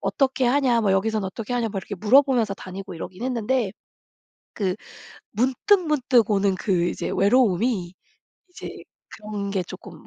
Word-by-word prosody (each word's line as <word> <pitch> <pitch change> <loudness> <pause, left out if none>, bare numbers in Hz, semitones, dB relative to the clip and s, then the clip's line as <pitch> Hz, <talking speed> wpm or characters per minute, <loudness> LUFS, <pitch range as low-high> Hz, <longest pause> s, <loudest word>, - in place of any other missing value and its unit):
"어떻게 265 -2 0
하냐? 250 -2 +3
뭐 210 -3 +1
여기선 215 +3 +1
어떻게 210 +5 -5
하냐?" 235 -2 0
막 200 -2 -4
이렇게 200 - -6
물어보면서 230 +1 +3
다니고 190 0 -8
이러긴 180 +5 -8
했는데 245 -3 0 0.8
그 190 -3 -1 0.6
문득문득 260 - +2
오는 200 -1 +2
그 185 -3 0
이제 - - -4
외로움이 200 -3 +2 0.6
이제 360 - -8 0.4
그런 210 -2 -5
게 195 -2 0
조금 180 -2 -11
215 Hz, 315 characters per minute, -24 LUFS, 195-250 Hz, 0.8 s, 하냐